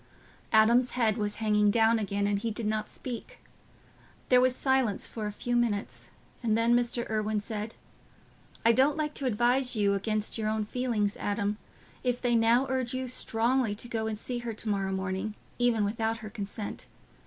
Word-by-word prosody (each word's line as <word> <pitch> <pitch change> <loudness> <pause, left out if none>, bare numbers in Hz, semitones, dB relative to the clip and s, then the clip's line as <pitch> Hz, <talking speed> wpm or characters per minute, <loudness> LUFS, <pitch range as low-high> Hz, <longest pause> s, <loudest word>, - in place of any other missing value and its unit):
'" - - -28
Adam's 235 +3 +5
head 225 -4 +3
was 210 -2 -2
hanging 210 -1 +2
down 225 +1 +4
again, 200 -1 -1
and 205 0 +1
he 230 - -2
did 225 +1 -4
not 215 0 -1
speak. 255 - -7 0.9
There 250 -1 +6
was 255 0 +3
silence 265 -7 +1
for 215 -2 -5
a - - -3
few 245 +4 -3
minutes, 230 -4 -1 0.3
and 225 -2 +1
then 230 +1 +3
Mr. 240 0 0
Irwine 215 -1 0
said, 215 +1 -5 0.9
"I 230 - +7
don't 270 +6 +3
like 300 -1 -1
to 275 - -2
advise 245 +3 +2
you 200 -2 +2
against 215 +2 -1
your 215 -1 0
own 215 0 -1
feelings, 220 -3 -1
Adam, 205 0 -1 0.4
if 250 -1 0
they 245 -1 +1
now 230 +3 +4
urge 260 -1 -1
you 260 0 -2
strongly 240 -1 0
to 230 - -6
go 225 -2 -2
and 220 -1 -3
see 245 +3 -3
her 235 -2 -5
to 220 - -5
morrow 195 -2 0
morning, 190 +2 -3 0.2
even 235 -4 +3
without 225 +2 -1
her 210 - -7
consent. 205 -1 -6
225 Hz, 185 wpm, -29 LUFS, 210-245 Hz, 0.9 s, I